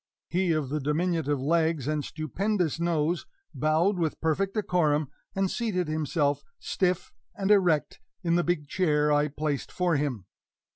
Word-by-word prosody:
He 180 +1 +1
of 155 -4 0
the 150 +2 -1
diminutive 150 0 0
legs 160 0 +1
and 150 -1 0
stupendous 170 - -1
nose 170 0 0 0.3
bowed 165 +6 +2
with 160 -2 -1
perfect 190 +6 0
decorum, 155 -8 +1 0.3
and 195 -1 +1
seated 200 -8 -1
himself, 155 -1 0 0.2
stiff 185 - -1 0.2
and 195 +1 0
erect, 180 -7 +3 0.2
in 170 -1 +1
the 175 0 +3
big 170 -4 -1
chair 150 -3 +2
I 145 0 +3
placed 150 -1 -3
for 175 -4 +1
him. 130 -9 -2
160 Hz, 145 wpm, -27 LUFS, 150-180 Hz, 0.3 s, erect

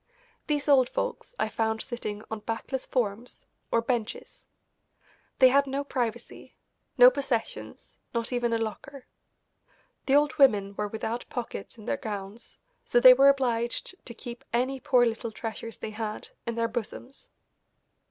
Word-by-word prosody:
These 295 -1 0
old 265 -4 +5
folks - - -4
I - - +1
found 220 0 -1
sitting 215 -4 -5
on 220 - -3
backless 225 +5 -4
forms, 235 -1 -2 0.3
or 230 - +2
benches. 230 -3 -4 0.9
They 260 -1 +8
had 280 +2 +3
no 275 +1 -2
privacy, 240 -4 -4 0.4
no 250 0 +9
possessions, 260 -4 -4
not 235 +1 -2
even 240 -1 0
a 230 - +2
locker. 250 +5 -6 1.0
The 270 - +4
old 295 +1 +3
women 205 -8 +5
were 210 - -2
without 220 +3 -4
pockets 235 -3 -6
in 215 - -12
their 280 - -1
gowns, 205 -2 -5 0.3
so 240 - +3
they 255 +1 +10
were 275 +2 +6
obliged 250 +6 -1
to 235 - -5
keep 240 +2 -9
any 255 +3 0
poor 250 -1 +4
little 230 0 -2
treasures 225 0 -6
they 215 - -6
had 215 0 -5 0.2
in 235 - -1
their 230 0 +1
bosoms. 240 +3 -6
240 Hz, 150 wpm, -28 LUFS, 225-265 Hz, 1.0 s, they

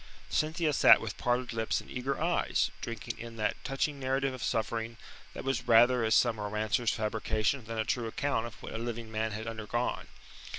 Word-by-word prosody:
Cynthia 155 0 +1
sat - - +8
with - - -6
parted 125 0 0
lips 110 -1 0
and - - -11
eager 135 +2 -3
eyes, 170 +3 +1
drinking 115 -1 -5
in 115 0 -8
that 110 -1 -2
touching 140 +1 -1
narrative 135 0 0
of 130 - -7
suffering 115 +1 -1 0.4
that - - -5
was 130 -2 -1
rather 120 +1 +6
as 110 0 +3
some 115 -3 +3
romancer's 105 +3 0
fabrication 110 +3 -1
than 115 +1 -5
a 110 - 0
true 120 0 -1
account 120 0 -1
of 115 - -13
what - - -7
a 110 - -3
living 115 -1 -5
man 110 0 -1
had 110 +1 -5
undergone. 115 +2 -2
115 Hz, 185 wpm, -31 LUFS, 110-130 Hz, 0.4 s, sat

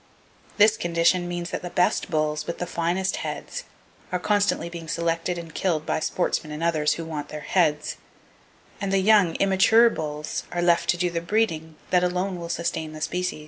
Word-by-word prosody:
This 215 +1 +5
condition 175 +1 +2
means 175 0 -4
that - - -3
the 175 - -5
best 180 +2 +1
bulls, 155 -2 -1
with 170 - -3
the 175 - -3
finest 175 +3 -1
heads, - - -5 0.5
are 180 - +1
constantly 205 -1 +1
being 170 -1 -8
selected 165 +2 -1
and 165 -2 -8
killed 160 -4 0
by - - 0
sportsmen 155 -1 -1
and 150 +2 -5
others 155 -3 +2
who 165 - -5
want 150 -2 -5
their 150 - -6
heads; 150 -2 +1 0.8
and 200 -1 -1
the 195 - +3
young, 190 -3 +4
immature 195 +4 +5
bulls 150 -3 -4
are 175 0 -1
left 170 -1 +3
to 175 - +3
do 175 0 0
the 170 0 -2
breeding 165 -5 -1 0.2
that 180 -1 +4
alone 180 +1 -1
will 170 0 -6
sustain 160 -2 -2
the 155 - -9
species. 180 0 -2
170 Hz, 185 wpm, -25 LUFS, 160-185 Hz, 0.8 s, This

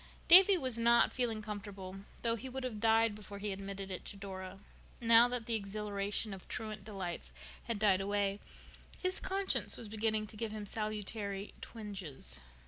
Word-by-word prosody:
Davy 380 +2 +10
was 255 -7 0
not 235 +1 +5
feeling 230 -4 -1
comfortable, 200 -3 -6 0.3
though 230 -1 +2
he 260 +3 -6
would 265 +1 -4
have 240 -5 -3
died 225 0 +4
before 205 -1 -8
he 205 0 -3
admitted 195 0 -5
it 185 - -5
to 200 - -6
Dora. 190 -1 -7 0.4
Now 230 0 +7
that 245 -2 -3
the 230 - -1
exhilaration 205 0 -2
of 190 - -10
truant 215 -2 -4
delights 180 - -5 0.3
had 230 - -2
died 195 -2 +4
away, 200 0 0 0.6
his 370 0 -1
conscience 390 0 +1
was 230 - -7
beginning 215 0 0
to 215 - -10
give 225 0 -3
him 215 -1 -5
salutary 210 -1 -3
twinges. 180 - -6
210 Hz, 165 wpm, -34 LUFS, 195-230 Hz, 0.6 s, Davy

